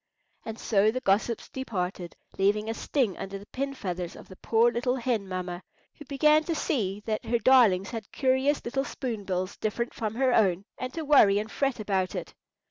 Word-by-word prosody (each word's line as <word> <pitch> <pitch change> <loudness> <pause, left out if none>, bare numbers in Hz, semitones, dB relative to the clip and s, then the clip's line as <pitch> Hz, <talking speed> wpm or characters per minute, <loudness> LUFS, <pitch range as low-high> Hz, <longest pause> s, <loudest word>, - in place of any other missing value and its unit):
And 225 0 -6
so 210 -2 +2
the 250 +4 -1
gossips 220 +1 0
departed, 185 -8 -4 0.2
leaving 210 +2 +2
a 225 - -1
sting 230 - -1
under 195 +1 -5
the 200 - -12
pin 275 +4 -4
feathers 180 -6 -4
of - - -13
the 185 - -11
poor 230 +4 +3
little 245 +2 0
hen 235 -5 -1
mamma, 180 -1 -4 0.4
who 295 - -10
began 300 +3 +3
to 335 - -1
see 210 - -1
that 215 -1 -2
her 235 - +1
darlings 230 -7 +4
had 225 -3 -7
curious 265 +2 +1
little 270 +3 -1
spoon 235 -7 -5
bills, 185 0 -2
different 235 +3 -2
from 220 -2 -3
her 260 0 +2
own, 195 -4 +2
and 255 0 -5
to 325 -2 -4
worry 240 -9 +6
and 215 +1 -3
fret 275 -4 -1
about 195 -3 -1
it. - - -5
225 Hz, 195 wpm, -27 LUFS, 195-260 Hz, 0.4 s, worry